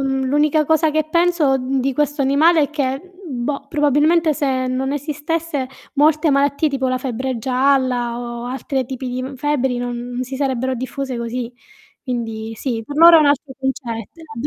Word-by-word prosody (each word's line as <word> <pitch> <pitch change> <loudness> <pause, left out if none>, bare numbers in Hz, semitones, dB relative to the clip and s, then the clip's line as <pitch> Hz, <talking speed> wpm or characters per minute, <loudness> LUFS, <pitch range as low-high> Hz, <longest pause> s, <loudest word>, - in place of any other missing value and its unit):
l'unica 280 +3 +1
cosa 315 +1 +2
che 310 0 0
penso, 335 -6 +2
mhmm, 265 +1 -1
di 270 +1 0
questo 290 +1 0
animale 310 +5 +4
è 285 - -1
che, 270 -3 -1 0.3
b 245 -3 -4
boh, 280 +1 -3
probabilmente 305 +2 +3
se 265 -3 -1
non 260 +2 -1
esistesse 295 0 -3 0.3
molte 305 +2 +3
malattie, 280 +2 +2
tipo 265 -1 -1
la 255 - 0
febbre 255 0 -3
gialla 255 -1 +1
o 240 0 -6
altre 265 0 -3
tipi 260 0 -5
di, 255 +1 -3
mhmm, 270 +1 -6
febbri 265 -2 0
non 245 0 -4
si 260 +1 -6
sarebbero 260 -2 -1
diffuse 260 +1 -4
così. 235 +1 -4 0.5
Quindi 225 -3 -4
sì, 230 0 -3
per 285 +6 -8
loro 335 +1 +9
è - - +5
un 300 - +4
altro 285 -1 +1
concetto. 265 +1 -4
Era 320 -2 -12
270 Hz, 175 wpm, -19 LUFS, 255-295 Hz, 0.5 s, loro